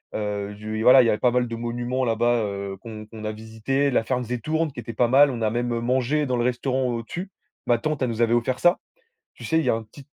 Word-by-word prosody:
heu 105 Hz, -1 st, -3 dB
du 110 Hz, +1 st, -5 dB
voilà 125 Hz, +1 st, +8 dB
il -, -, +1 dB
y 115 Hz, -, +3 dB
avait 105 Hz, -, +2 dB
pas 125 Hz, 0 st, +2 dB
mal 125 Hz, 0 st, +1 dB
de 115 Hz, -, -5 dB
monuments 120 Hz, +2 st, -2 dB
là-bas, 120 Hz, +1 st, +2 dB
heu, 100 Hz, -1 st, -5 dB
qu'on 110 Hz, +1 st, -9 dB
qu'on 110 Hz, -1 st, -9 dB
a 110 Hz, -, -1 dB
visité, 110 Hz, +6 st, -1 dB
la 120 Hz, -, +2 dB
Fernsehturm 125 Hz, +6 st, -1 dB
qui 125 Hz, -, -9 dB
était 115 Hz, 0 st, -6 dB
pas 120 Hz, +2 st, +2 dB
mal, 140 Hz, +2 st, +6 dB
on 120 Hz, -, -5 dB
a 110 Hz, -, +2 dB
même, 120 Hz, +2 st, -1 dB
heu, 115 Hz, -, -2 dB
mangé 130 Hz, +5 st, +1 dB
dans 125 Hz, -2 st, -1 dB
le 120 Hz, -, +1 dB
restaurant 130 Hz, +1 st, 0 dB
au-dessus. 125 Hz, -, -5 dB, 0.4 s
Ma 120 Hz, -, +4 dB
tante 150 Hz, +4 st, -3 dB
elle 130 Hz, -, +2 dB
nous 115 Hz, 0 st, -3 dB
avait 115 Hz, 0 st, +3 dB
offert 120 Hz, +2 st, 0 dB
ça. 175 Hz, 0 st, +4 dB, 0.5 s
Tu -, -, -13 dB
sais, 160 Hz, -, +1 dB
il -, -, -1 dB
y -, -, +2 dB
a -, -, +4 dB
un 115 Hz, -, -4 dB
petit 130 Hz, +6 st, -15 dB
120 Hz, 265 wpm, -24 LUFS, 110-130 Hz, 0.5 s, voilà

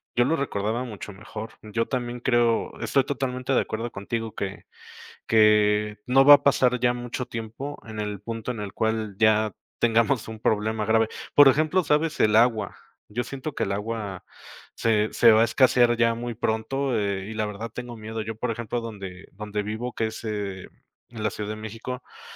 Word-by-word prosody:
yo 120 Hz, -, +4 dB
lo 155 Hz, +5 st, +2 dB
recordaba 115 Hz, -4 st, -2 dB
mucho 105 Hz, -4 st, -8 dB
mejor. 110 Hz, +2 st, -8 dB
Yo 115 Hz, +2 st, -2 dB
también 120 Hz, -2 st, -3 dB
creo 120 Hz, -2 st, +1 dB
estoy 135 Hz, -2 st, +1 dB
totalmente 135 Hz, -2 st, -2 dB
de -, -, +4 dB
acuerdo 115 Hz, +2 st, -4 dB
contigo 115 Hz, +2 st, -4 dB
que 100 Hz, 0 st, -5 dB, 0.6 s
que 105 Hz, -1 st, +4 dB
no 135 Hz, +2 st, +5 dB
va 145 Hz, +1 st, +11 dB
a -, -, -3 dB
pasar 125 Hz, -3 st, +3 dB
ya 120 Hz, 0 st, +2 dB
mucho 120 Hz, +1 st, -4 dB
tiempo 115 Hz, +6 st, -6 dB
en 110 Hz, -1 st, -7 dB
el 105 Hz, -1 st, -3 dB
punto 115 Hz, +2 st, -4 dB
en 115 Hz, -, -6 dB
el 100 Hz, -2 st, -5 dB
cual 110 Hz, -2 st, -1 dB
ya 110 Hz, -1 st, +4 dB, 0.3 s
tengamos 115 Hz, +2 st, +2 dB
un 110 Hz, -1 st, -8 dB
problema 110 Hz, 0 st, 0 dB
grave. 110 Hz, +1 st, +3 dB, 0.3 s
Por 145 Hz, -1 st, +9 dB
ejemplo, 155 Hz, +7 st, +3 dB
sabes, 150 Hz, +1 st, +1 dB
el 105 Hz, 0 st, +4 dB
agua, 115 Hz, -1 st, +3 dB, 0.3 s
yo 120 Hz, +4 st, -3 dB
siento 140 Hz, +3 st, -6 dB
que -, -, -1 dB
el 100 Hz, -, -2 dB
agua 105 Hz, -2 st, -4 dB, 0.5 s
se 110 Hz, -2 st, +2 dB
se 115 Hz, -, +6 dB
va 110 Hz, 0 st, +5 dB
a -, -, +6 dB
escasear 120 Hz, -1 st, +4 dB
ya 115 Hz, 0 st, +3 dB
muy 120 Hz, +1 st, -4 dB
pronto, 120 Hz, +4 st, -1 dB
eh, 100 Hz, -2 st, -1 dB
y -, -, -5 dB
la 110 Hz, -1 st, -1 dB
verdad 105 Hz, +2 st, -6 dB
tengo 125 Hz, -1 st, -6 dB
miedo. 110 Hz, +1 st, -5 dB
Yo, 110 Hz, +1 st, -5 dB
por 115 Hz, +2 st, -2 dB
ejemplo, 115 Hz, +1 st, -3 dB
donde 100 Hz, -5 st, -8 dB
donde 105 Hz, +1 st, -4 dB
vivo, 110 Hz, +4 st, -4 dB
que 110 Hz, -, -1 dB
es, 110 Hz, +1 st, -8 dB
eh, 100 Hz, -4 st, -4 dB, 0.4 s
en 115 Hz, -2 st, -7 dB
la 110 Hz, -, +2 dB
Ciudad 105 Hz, +1 st, -5 dB
de -, -, -4 dB
México, 115 Hz, +4 st, -7 dB
eh, -, -, -18 dB
115 Hz, 195 wpm, -25 LUFS, 105-125 Hz, 0.6 s, va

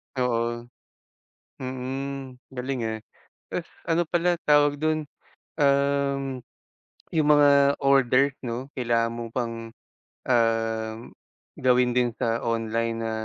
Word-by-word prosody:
Oo. 120 Hz, -2 st, 0 dB, 1.0 s
Mm, 130 Hz, +1 st, -5 dB, 0.2 s
galing 130 Hz, 0 st, -3 dB
eh. 110 Hz, 0 st, -3 dB, 0.5 s
Tapos -, -, -4 dB, 0.2 s
ano 165 Hz, +1 st, +2 dB
pala 175 Hz, 0 st, +2 dB
tawag 145 Hz, -1 st, +3 dB
dun, 155 Hz, -1 st, 0 dB, 0.5 s
um. 140 Hz, -1 st, +1 dB, 0.8 s
Yung 155 Hz, -2 st, +3 dB
mga 140 Hz, -1 st, +5 dB
order 135 Hz, 0 st, +3 dB
'no 120 Hz, +1 st, -4 dB
kailangan 115 Hz, -2 st, +1 dB
mo 115 Hz, -1 st, -6 dB
pang, 115 Hz, -1 st, -4 dB, 0.6 s
um, 115 Hz, -2 st, +1 dB, 0.6 s
gawin 125 Hz, -1 st, +2 dB
din 125 Hz, 0 st, +2 dB
sa 115 Hz, 0 st, 0 dB
online 115 Hz, 0 st, -1 dB
na, 115 Hz, 0 st, -3 dB
125 Hz, 105 wpm, -25 LUFS, 115-140 Hz, 1.0 s, mga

